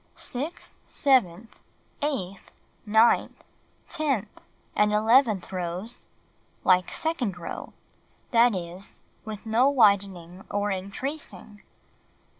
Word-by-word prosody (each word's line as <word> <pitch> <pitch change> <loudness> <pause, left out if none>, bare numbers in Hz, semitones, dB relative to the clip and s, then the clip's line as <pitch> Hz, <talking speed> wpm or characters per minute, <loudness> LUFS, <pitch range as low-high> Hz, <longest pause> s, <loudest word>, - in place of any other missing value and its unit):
Sixth, 290 +8 -5
seventh, 230 -6 +2 0.5
eighth, 200 -11 -3 0.4
ninth, 220 +3 +3 0.4
tenth 275 - -2 0.3
and 210 0 +3
eleventh 220 -2 +3
rows: 185 +5 -5 0.6
Like 185 -1 +4
second 260 - -2
row 170 - -7 0.3
— - - -37
that 235 -2 +5
is, 180 +2 -8 0.3
with 215 0 -7
no 230 +5 +3
widening 195 -7 +2
or 205 0 -1
increasing. 205 +2 -6
210 Hz, 90 wpm, -26 LUFS, 190-250 Hz, 0.6 s, that